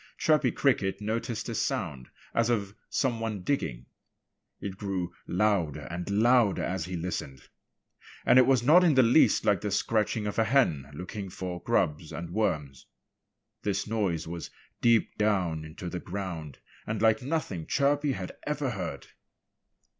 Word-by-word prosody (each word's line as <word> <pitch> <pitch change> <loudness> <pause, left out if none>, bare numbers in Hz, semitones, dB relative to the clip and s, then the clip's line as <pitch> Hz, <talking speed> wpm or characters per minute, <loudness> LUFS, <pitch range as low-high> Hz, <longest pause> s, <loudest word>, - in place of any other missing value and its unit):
Chirpy 155 -1 +3
Cricket 100 -8 +1
noticed 115 +2 -3
a 115 - -3
sound 95 - -2 0.2
as 115 0 +2
of 100 -4 0 0.2
some 120 -4 0
one 110 -4 -3
digging. 65 - -2 0.7
It 100 -2 -5
grew 95 -3 -3
louder 90 -6 +1
and 90 +2 -4
louder 115 0 +3
as 90 -3 -2
he 90 0 -5
listened. 80 -6 -5 0.8
And 130 - +7
it 125 - +5
was 130 -3 +4
not 165 +8 +7
in 165 -5 +4
the 130 - +7
least 120 +7 +4
like 100 -4 +3
the 105 - -2
scratching 105 +1 0
of 105 +2 -2
a - - +5
hen, 90 - +2
looking 95 +4 -6
for 90 -1 -5
grubs 75 +1 0
and 85 0 -6
worms. 75 -11 -1 0.7
This 100 -2 -1
noise 100 -8 -1
was 85 0 -6 0.3
deep 115 -2 +3
down 95 -7 +1
in 80 0 -11
the 90 0 -4
ground 85 -7 -6 0.3
and 110 0 -2
like 110 0 +3
nothing 125 - -3
Chirpy 145 0 +2
had 90 -6 -5 0.2
ever 145 -3 -1
heard. 90 - -5
100 Hz, 155 wpm, -28 LUFS, 85-115 Hz, 0.8 s, And